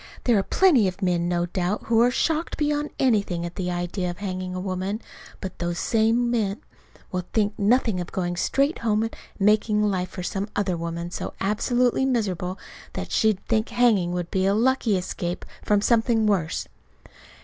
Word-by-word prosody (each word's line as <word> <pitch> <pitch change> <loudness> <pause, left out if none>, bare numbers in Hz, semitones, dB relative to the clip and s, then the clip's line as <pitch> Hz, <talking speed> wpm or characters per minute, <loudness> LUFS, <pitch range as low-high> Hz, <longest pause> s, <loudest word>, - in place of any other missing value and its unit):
There 240 - +3
are - - +3
plenty 275 - +4
of 185 +2 -4
men, 175 -1 +1
no 175 0 +1
doubt, 180 +3 -2
who 230 0 +3
are 240 - +5
shocked 320 +5 0
beyond 295 0 0
anything 200 -9 +1
at 175 0 -7
the 180 -1 -2
idea 175 +1 -2
of 175 - -6
hanging 185 -2 -4
a - - -3
woman; 190 +2 -2 0.4
but 190 - -7
those 175 0 -2
same 230 +3 +2
men 210 -4 0 0.5
will 180 -1 -2
think 210 -1 +2
nothing 220 -1 +2
of 175 - -7
going 175 -2 -2
straight 275 - +1
home 220 -1 +1
and 225 - -4 0.2
making 210 +1 +3
life 185 -3 0
for 180 - -7
some 195 +3 -3
other 195 -3 0
woman 170 +1 -4
so - - -5
absolutely 240 +5 +1
miserable 190 -7 -1 0.4
that - - -5
she'd 215 -3 +2
think 220 0 0
hanging 230 -7 +3
would 175 -1 -3
be 190 0 +1
a 200 - +3
lucky 235 -3 +2
escape 180 -1 -4 0.2
from 205 -1 +2
something 225 0 +3
worse." 185 -7 0
200 Hz, 180 wpm, -24 LUFS, 180-230 Hz, 0.5 s, are